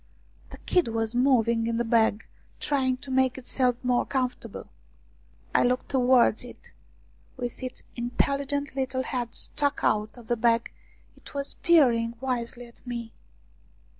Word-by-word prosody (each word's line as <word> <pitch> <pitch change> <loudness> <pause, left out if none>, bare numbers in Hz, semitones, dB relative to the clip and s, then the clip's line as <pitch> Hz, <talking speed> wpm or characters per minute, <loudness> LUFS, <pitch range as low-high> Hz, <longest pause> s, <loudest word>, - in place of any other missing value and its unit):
The - - -10
kid 360 -6 +1
was 225 0 -1
moving 235 -3 +3
in 230 0 0
the 235 - 0
bag, 225 -2 +2 0.3
trying 260 -3 +1
to 270 - -7
make 260 -1 +2
itself 255 -1 0
more 250 -1 +2
comfortable. 255 -2 -3 0.9
I - - +4
looked 250 +1 0
towards 250 -4 +4
it; 245 - -13 0.7
with 245 0 -5
its 255 -1 -6
intelligent 280 +3 -1
little 260 -1 -1
head 245 -3 -4
stuck 285 -1 0
out 215 +2 +1
of 240 - -12
the 240 +2 0
bag 230 0 +2 0.4
it - - -15
was 280 0 0
peering 235 -9 +3
wisely 245 -2 -3
at 235 - -16
me. 235 -2 -5
245 Hz, 140 wpm, -27 LUFS, 235-265 Hz, 0.9 s, I